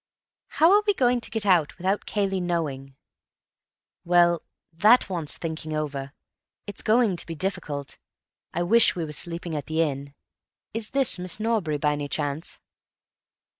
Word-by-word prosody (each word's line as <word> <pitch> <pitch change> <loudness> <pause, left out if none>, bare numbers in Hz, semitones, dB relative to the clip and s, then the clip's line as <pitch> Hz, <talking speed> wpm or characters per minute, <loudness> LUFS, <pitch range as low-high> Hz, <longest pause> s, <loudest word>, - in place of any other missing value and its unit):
"How 325 +3 +4
are 415 - +5
we 410 - +3
going 245 -3 +2
to - - -5
get 225 -3 +3
out 175 -6 +3
without 190 +3 -1
Cayley 195 -2 -1
knowing?" 145 -6 -3 1.1
"Well, 175 -1 +4 0.3
that 210 +5 +4
wants 160 -6 -2
thinking 160 -1 -5
over. 140 -3 -3 0.5
It's 205 - -5
going 220 -4 +2
to - - -5
be 165 - -5
difficult. 150 -5 -4 0.5
I 175 - -1
wish 230 +6 +4
we 170 -2 -2
were 150 - -7
sleeping 170 +1 -3
at 145 - -4
the 160 +1 +1
inn.... 140 -1 -4 0.6
Is 220 -1 -3
this 270 -8 +2
Miss 180 +2 -1
Norbury, 215 -9 0
by 150 +1 +1
any 145 -1 -3
chance?" 145 +3 -3
170 Hz, 155 wpm, -25 LUFS, 150-205 Hz, 1.1 s, are